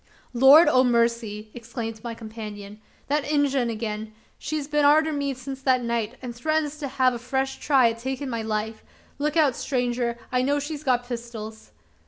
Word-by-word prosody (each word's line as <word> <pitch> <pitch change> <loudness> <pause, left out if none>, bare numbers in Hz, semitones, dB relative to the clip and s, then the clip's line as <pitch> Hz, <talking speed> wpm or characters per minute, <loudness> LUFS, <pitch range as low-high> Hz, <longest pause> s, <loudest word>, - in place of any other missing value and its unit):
"Lord 270 +7 +8
o' 255 -3 +5
mercy!" 235 -3 0
exclaimed 225 -2 -6
my 235 -1 -5
companion, 215 -2 -9 0.3
"that 290 +1 +1
Injun 280 -4 +1
again! 215 -1 -4 0.3
She's 300 -2 -3
been 295 0 +1
arter 310 +2 +4
me 280 -2 -2
since 265 +1 -7
that 255 -2 +2
night, 235 0 -2
an' 245 -1 -5
threatens 305 +4 -1
to 290 - -3
have 260 -1 +2
a 240 - -5
fresh 265 +2 -2
try 260 -5 +4
at 230 - -9
takin' 265 +3 -4
my 230 -3 -3
life. 220 0 -3 0.4
Look 300 +2 0
out 290 -6 +4
stranger! 245 -2 -1
I 250 0 +2
know 285 +3 +1
she's 290 +1 -4
got 245 -3 +1
pistols." 230 -3 -7
250 Hz, 175 wpm, -25 LUFS, 230-280 Hz, 0.4 s, Lord